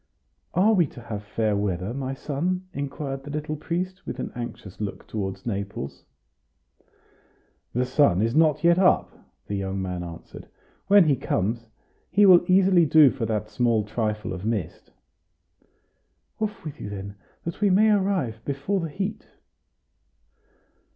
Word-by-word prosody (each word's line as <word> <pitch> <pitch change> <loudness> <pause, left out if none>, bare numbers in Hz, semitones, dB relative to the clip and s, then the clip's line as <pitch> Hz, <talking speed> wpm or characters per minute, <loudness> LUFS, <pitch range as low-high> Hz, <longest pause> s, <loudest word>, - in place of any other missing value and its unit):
"Are 200 +5 +5
we 175 -7 +3
to 125 - -12
have 110 -3 -5
fair 105 0 0
weather, 100 +1 -2
my 135 0 -3
son?" 175 +7 -2
inquired 140 -1 -4
the 145 - -9
little 150 +1 -3
priest, 180 +4 -4
with - - -4
an - - -4
anxious 120 -5 -7
look 100 -2 -5
toward 95 -3 -5
Naples. 100 - -5 1.7
"The 125 +2 +1
sun 125 -8 +3
is 115 +2 +1
not 155 -2 +3
yet 170 +1 +5
up," 185 -1 +3 0.3
the - - -5
young 95 0 -3
man 90 -2 -3
answered; 85 -1 -10 0.4
"when 200 -1 +7
he 145 -3 +3
comes, 115 -2 -2 0.4
he 205 +3 +5
will 180 -3 +8
easily 185 -1 +5
do 150 -2 +7
for 115 -4 -3
that 105 -1 -2
small 115 -1 +2
trifle 105 -1 -2
of 95 0 -7
mist." 105 -7 -3 1.5
"Off 215 -5 -3
with 150 - -7
you, 105 - -5
then! 100 0 -6 0.3
that 170 +4 -5
we 205 - +4
may 210 +4 +5
arrive 190 - 0
before 140 +8 -1
the 165 -2 -3
heat." 195 +7 -4
135 Hz, 150 wpm, -25 LUFS, 105-175 Hz, 1.7 s, will